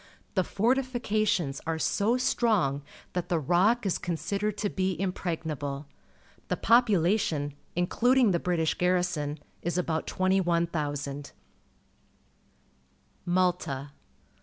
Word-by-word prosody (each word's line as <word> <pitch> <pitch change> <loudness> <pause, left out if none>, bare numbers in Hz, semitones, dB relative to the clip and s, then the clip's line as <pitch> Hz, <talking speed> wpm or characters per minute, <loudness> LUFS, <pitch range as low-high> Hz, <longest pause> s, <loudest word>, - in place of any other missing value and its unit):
The 185 - +2
fortifications 215 - 0
are 165 0 0
so 210 +8 +1
strong 215 - +1 0.3
that 180 -1 -3
the 175 - +2
Rock 185 - +2
is 190 - 0
considered 200 +4 -2
to 205 - 0
be 185 -3 -1
impregnable. 160 -6 -3 0.6
The - - -1
population, 195 - +3 0.2
including 235 +7 +3
the 170 - +1
British 165 -3 +1
garrison, 175 -5 0 0.2
is 175 +1 -2
about 165 -3 -1
21,000. 170 -7 0 1.9
Malta. 175 -6 0
180 Hz, 95 wpm, -28 LUFS, 160-205 Hz, 1.9 s, population